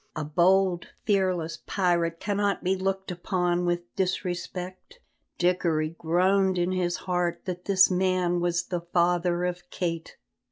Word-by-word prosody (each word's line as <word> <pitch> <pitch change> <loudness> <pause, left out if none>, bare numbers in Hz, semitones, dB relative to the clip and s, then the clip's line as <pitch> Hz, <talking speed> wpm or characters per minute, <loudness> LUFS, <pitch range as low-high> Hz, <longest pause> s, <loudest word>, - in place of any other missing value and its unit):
A 155 - -2
bold, 180 +3 +2 0.2
fearless 185 -5 0
pirate 170 -3 +1
cannot 205 -1 -1
be 185 +1 +2
looked 190 0 -2
upon 180 0 0
with 175 0 -2
disrespect." 185 - -3 0.4
Dickory 170 -3 +1
groaned 185 +3 +2
in 175 +1 +1
his 180 -1 0
heart 175 -2 -1
that 180 -1 -5
this 190 -1 +5
man 180 -1 +1
was 175 0 0
the 175 -1 -3
father 175 0 +1
of 180 0 -4
Kate. 165 -3 -4
180 Hz, 130 wpm, -27 LUFS, 175-185 Hz, 0.4 s, this